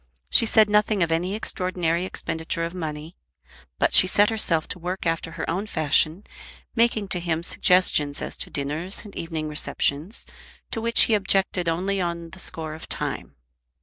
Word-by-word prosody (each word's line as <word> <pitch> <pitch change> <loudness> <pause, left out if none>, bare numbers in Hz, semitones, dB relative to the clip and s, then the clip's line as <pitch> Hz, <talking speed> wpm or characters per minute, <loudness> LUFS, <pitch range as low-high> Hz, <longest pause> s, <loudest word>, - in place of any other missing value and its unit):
She 230 - +7
said 215 -1 +5
nothing 210 -2 +2
of 165 - -2
any 180 +4 -1
extraordinary 180 -4 -2
expenditure 165 -2 -3
of 170 - -6
money. 155 -2 -6 0.6
But - - +1
she 185 - +8
set 205 +3 +3
herself 170 -8 0
to - - -3
work 180 +2 -5
after 165 0 -2
her 165 - -5
own 190 +6 -2
fashion, 160 +2 +1 0.5
making 230 -3 +2
to 180 - +2
him 170 -1 -2
suggestions 170 -6 +2
as - - -6
to - - -7
dinners 150 +9 -2
and 205 - -12
evening 160 -2 -4
receptions, 150 - -1 0.5
to 225 - -3
which 230 +1 +4
he 225 - +5
objected 195 -3 +1
only 190 +4 -1
on 170 -1 -4
the 190 - -11
score 160 -3 -3
of 160 - -11
time. - - -4
175 Hz, 170 wpm, -24 LUFS, 160-195 Hz, 0.6 s, she